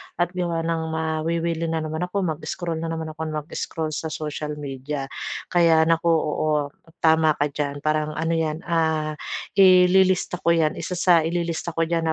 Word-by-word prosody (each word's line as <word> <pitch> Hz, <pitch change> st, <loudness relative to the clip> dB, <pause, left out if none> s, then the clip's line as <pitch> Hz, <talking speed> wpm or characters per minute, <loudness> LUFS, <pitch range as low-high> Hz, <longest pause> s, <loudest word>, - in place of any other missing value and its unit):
At 175 Hz, 0 st, 0 dB
gawa 175 Hz, -2 st, -2 dB
ng 165 Hz, 0 st, -1 dB
mawiwili 165 Hz, +1 st, -1 dB
na 160 Hz, -1 st, -1 dB
naman 160 Hz, +3 st, -3 dB
ako, 200 Hz, +2 st, -2 dB
mag-scroll 165 Hz, 0 st, -3 dB
na 165 Hz, -, -3 dB
naman 160 Hz, -1 st, -4 dB
ako 155 Hz, -, -18 dB
nang 155 Hz, -1 st, -3 dB
mag-scroll 160 Hz, 0 st, -4 dB
sa 155 Hz, +1 st, -3 dB
social 150 Hz, -1 st, -4 dB
media. 140 Hz, -1 st, -5 dB, 0.4 s
Kaya 165 Hz, -2 st, +5 dB
naku, 165 Hz, +1 st, +1 dB
oo, 155 Hz, -2 st, +1 dB, 0.3 s
tama 160 Hz, -1 st, +4 dB
ka 145 Hz, 0 st, 0 dB
diyan. 145 Hz, 0 st, -3 dB
Parang 155 Hz, 0 st, 0 dB
ano 165 Hz, +1 st, -1 dB
'yan, 160 Hz, 0 st, -1 dB
ah, 160 Hz, -2 st, 0 dB, 0.5 s
ililista 185 Hz, -1 st, +5 dB
ko 170 Hz, -, +2 dB
'yan. 160 Hz, -2 st, +2 dB
Isa -, -, -4 dB
sa 175 Hz, -2 st, +4 dB
ililista 170 Hz, 0 st, -2 dB
ko 165 Hz, -, -1 dB
diyan 165 Hz, -1 st, 0 dB
160 Hz, 170 wpm, -23 LUFS, 155-170 Hz, 0.5 s, Kaya